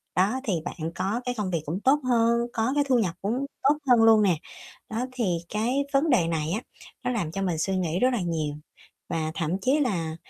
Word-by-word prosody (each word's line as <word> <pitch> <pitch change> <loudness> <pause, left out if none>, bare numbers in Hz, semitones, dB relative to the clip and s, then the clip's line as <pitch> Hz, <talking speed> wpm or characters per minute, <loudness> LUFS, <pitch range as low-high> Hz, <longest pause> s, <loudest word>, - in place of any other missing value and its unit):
đó 200 +8 +2
thì 215 - -1
bạn 165 -2 -4
có 210 +6 -1
cái 250 0 -2
công 200 -3 -2
việc 165 -3 0
cũng 165 +6 -3
tốt 275 +5 +4
hơn, 235 -1 +2
có 225 +3 0
cái 290 - +3
thu 255 -3 +4
nhập 180 -6 0
cũng 240 +8 -1 0.2
tốt 290 +2 +4
hơn 240 -2 +6
luôn 225 -1 +7
nè. 185 -5 +3 0.5
Đó, 225 +3 -2
thì 225 -9 0
cái 240 +7 0
vấn 280 +4 +3
đề 225 - +3
này 160 -1 -1
á 215 +6 -1 0.4
nó 250 - 0
làm 200 -10 -2
cho 195 - -4
mình 180 -4 0
suy 190 +5 0
nghĩ 175 -1 -1
rất 255 - +4
là 235 - 0
nhiều 160 -4 -2 0.5
và 160 -1 -1
thậm 165 +2 -1
chí 265 +9 +2
là, 175 - -1
210 Hz, 225 wpm, -26 LUFS, 170-245 Hz, 0.5 s, luôn